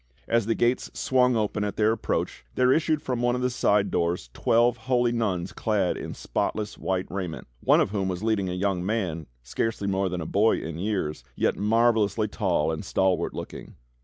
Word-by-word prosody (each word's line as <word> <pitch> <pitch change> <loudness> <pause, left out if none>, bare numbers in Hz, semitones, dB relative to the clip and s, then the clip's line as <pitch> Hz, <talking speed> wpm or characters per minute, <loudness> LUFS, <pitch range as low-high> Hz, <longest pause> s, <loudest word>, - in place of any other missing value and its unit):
As 115 -2 +1
the 115 - +1
gates 120 +2 +1
swung 125 -1 +2
open 105 -1 0
at 105 - -3
their 110 0 +3
approach, 110 - -2
there 130 0 +4
issued 155 -1 +1
from 125 -2 -2
one 120 0 +2
of 125 - -2
the 125 - +1
side 105 -4 +2
doors 85 -8 -1
twelve 120 +1 +3
holy 120 -2 +3
nuns 100 -7 -1
clad 105 -5 0
in - - -6
spotless 105 -1 -2
white 95 -1 -2
raiment, 90 -4 -4
one - - +4
of - - +1
whom 100 -2 -1
was 90 +1 -3
leading 110 -4 +1
a - - -3
young 90 -1 -1
man, 90 -7 -2 0.2
scarcely 100 - -2
more 95 -1 0
than 90 0 -3
a 80 - -4
boy 105 +7 +3
in 80 0 -5
years, 95 -6 -2
yet - - +1
marvelously 110 -1 +2
tall 90 -7 0
and 80 - -4
stalwart 95 -1 0
looking. - - -8
105 Hz, 190 wpm, -26 LUFS, 90-115 Hz, 0.2 s, there